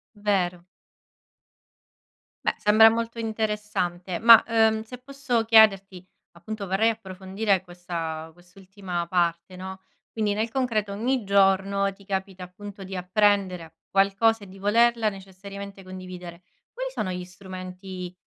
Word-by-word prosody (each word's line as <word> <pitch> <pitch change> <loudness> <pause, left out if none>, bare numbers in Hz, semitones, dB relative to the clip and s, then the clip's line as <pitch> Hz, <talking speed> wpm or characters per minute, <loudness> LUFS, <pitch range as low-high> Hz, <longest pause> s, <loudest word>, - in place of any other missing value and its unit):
Vero. 185 -4 -1 1.8
Beh, - - +1
sembra 215 +2 +6
molto 230 +1 -3
interessante. 210 -5 -2
Ma, 230 0 +9
ehm, 220 -1 +3
se 250 +2 -10
posso 255 -3 -2
chiederti, 195 -5 +4 0.3
appunto, 200 +4 -7
vorrei 195 +5 +2
approfondire 195 -1 -2
questa 170 -3 -6
quest'ultima 180 0 -7
parte, 170 0 -1
no? 190 +1 -8 0.3
Quindi 215 -2 0
nel 220 +2 -1
concreto 225 -5 -1
ogni 240 +4 -1
giorno 195 0 +2
ti 195 0 -19
capita, 190 -1 -4
appunto, 200 +2 -10
di 190 0 -7
apprendere 185 -3 +1
qualcosa 200 +3 +2
e - - -11
di 190 +1 -14
volerla 230 +2 +3
necessariamente 195 0 -10
condividere. 180 -2 -9 0.3
Quali - - -4
sono 185 - -3
gli 180 0 -5
strumenti 185 0 -8
195 Hz, 120 wpm, -25 LUFS, 185-220 Hz, 1.8 s, Ma